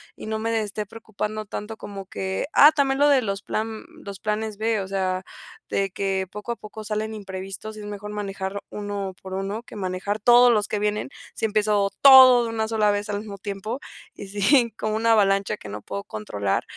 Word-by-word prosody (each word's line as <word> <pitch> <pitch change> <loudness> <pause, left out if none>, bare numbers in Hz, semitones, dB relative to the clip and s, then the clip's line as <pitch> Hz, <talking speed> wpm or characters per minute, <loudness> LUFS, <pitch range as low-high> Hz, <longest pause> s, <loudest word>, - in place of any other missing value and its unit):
y - - -9
no 220 0 -2
me 225 +1 -1
de 225 -1 +1
esté 210 0 -4
preocupando 215 0 -5
tanto 210 +2 -6
como 200 -2 -8
que, 190 +4 -3
ah, 295 +2 +9
también 275 -3 +1
lo 290 +1 +5
de 275 -2 +5
los 200 -3 -3
plan 220 0 -3 0.2
los 200 -1 -7
planes 215 0 -2
b, 220 0 0
o 190 - -4
sea, 185 -1 -1 0.5
de 195 -1 0
que, 190 0 -1
poco 210 +3 -5
a - - -9
poco 215 0 -10
salen 215 +1 -2
imprevistos 195 +1 -7
y - - -8
es - - -8
mejor 205 0 -6
manejar 200 -1 -4
uno 205 -2 -4
por 190 0 -8
uno, 195 +3 -3
que - - -13
manejar 195 +1 -3
todos 240 +3 +7
los 210 -3 +2
que 210 - -2
vienen, 210 +4 -1 0.3
si - - -1
empiezo 210 -2 +1
todo 260 -3 +9
de 230 - -3
una 220 -1 -1
sola 220 -2 +2
vez 205 +1 -2
al 205 -1 -1
mismo 205 -1 -8
tiempo, 205 +4 -5 0.4
y 200 - -8
si 230 +5 +3
como 215 0 -3
una 230 +1 +2
avalancha 195 -3 +3
que 105 - -10
no 105 +1 -6
puedo 100 0 -5
controlar 100 -2 -2
210 Hz, 210 wpm, -24 LUFS, 195-220 Hz, 0.5 s, ah